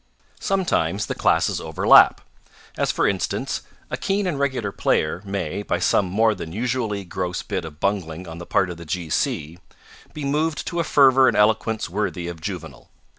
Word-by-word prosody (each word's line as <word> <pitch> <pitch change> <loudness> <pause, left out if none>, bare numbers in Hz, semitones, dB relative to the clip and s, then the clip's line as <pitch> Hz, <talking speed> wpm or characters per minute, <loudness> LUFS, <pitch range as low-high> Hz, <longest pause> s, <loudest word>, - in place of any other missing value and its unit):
Sometimes 190 -2 0
the - - -3
classes - - +1
overlap. - - +5 0.5
As - - 0
for - - +1
instance, - - -2 0.3
a - - -1
keen 200 -2 -1
and 165 -6 -2
regular 130 -7 -1
player 80 -2 0
may, 95 -2 -3
by 105 - -1
some 95 - +2
more 110 +4 +2
than 85 -5 -7
usually 110 -2 -2
gross 90 0 -3
bit 90 - -3
of 75 -1 -10
bungling 90 -3 -2
on 80 0 -8
the 85 - -9
part 95 -2 +1
of 85 - -8
the 85 - -10
G. 80 0 -4
C., 80 +4 -1 0.5
be 150 -2 -6
moved 150 +3 0
to 170 - -3
a - - +2
fervour 135 -3 +5
and - - +2
eloquence 110 +1 +2
worthy 90 -2 -3
of 85 -2 -7
Juvenal. 80 -7 -7
100 Hz, 180 wpm, -23 LUFS, 85-130 Hz, 0.5 s, overlap